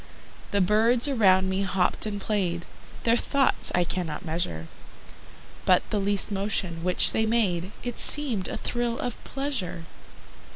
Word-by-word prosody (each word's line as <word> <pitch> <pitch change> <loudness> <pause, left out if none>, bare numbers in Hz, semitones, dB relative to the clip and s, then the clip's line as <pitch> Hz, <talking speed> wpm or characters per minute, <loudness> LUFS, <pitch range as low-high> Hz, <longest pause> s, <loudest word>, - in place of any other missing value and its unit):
The 200 - +1
birds 225 +7 +3
around 190 -8 +3
me 190 +1 -1
hopped 190 +1 0
and 205 -1 -4
played, 185 -5 -2 0.4
Their 230 0 +3
thoughts 275 +2 0
I 180 - +2
cannot 175 -2 -4
measure: 155 - -3 1.0
But 180 -1 +2
the 210 - 0
least 200 +1 +1
motion 195 -4 -1
which 180 0 +6
they 220 0 0
made 195 -5 0
It 245 -1 -4
seemed 255 -11 +3
a - - -5
thrill 240 -1 -2
of 245 -2 -5
pleasure. 260 -12 -3
200 Hz, 140 wpm, -25 LUFS, 180-230 Hz, 1.0 s, which